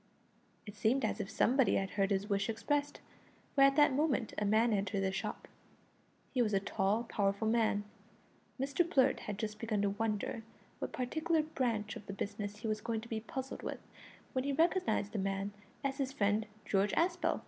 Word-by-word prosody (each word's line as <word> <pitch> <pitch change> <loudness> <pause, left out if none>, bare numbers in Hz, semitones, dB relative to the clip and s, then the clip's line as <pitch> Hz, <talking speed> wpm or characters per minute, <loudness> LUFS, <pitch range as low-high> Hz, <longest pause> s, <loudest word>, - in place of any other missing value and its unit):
It 205 - -8
seemed 240 +6 +2
as - - -1
if 200 -1 -3
somebody 245 +4 +3
had 195 0 0
heard 195 -1 +1
his 200 0 0
wish 200 0 0
expressed, 290 +6 -1 0.5
for 275 - +3
at 275 0 +7
that 295 -2 +5
moment 275 -5 +1
a 210 - 0
man 220 +3 +4
entered 200 0 0
the 190 -1 +1
shop. 190 - -4 0.9
He 255 - +2
was 215 -3 +2
a - - +4
tall, 200 +3 0
powerful 200 -1 0
man. 220 -2 +2 0.8
Mr 280 +6 +2
Blurt 275 -6 +3
had 210 -2 -5
just 215 0 -4
begun 215 -3 0
to 200 - +2
wonder 215 +1 -2 0.4
what - - -3
particular 315 +5 0
branch 235 -8 -1
of 210 - -10
the 195 - -4
business 205 +1 -4
he 225 - -3
was 215 -1 -1
going 225 0 -2
to 235 - -11
be 225 - -1
puzzled 265 +4 -5
with, - - -4 0.5
when 255 - 0
he 280 +1 0
recognised 330 - +2
the 210 - -2
man 195 +1 -2 0.3
as 275 0 -2
his 270 -1 0
friend 210 -3 +1 0.2
George 195 +1 +2
Aspel. 345 +1 +1
220 Hz, 190 wpm, -34 LUFS, 205-270 Hz, 0.9 s, at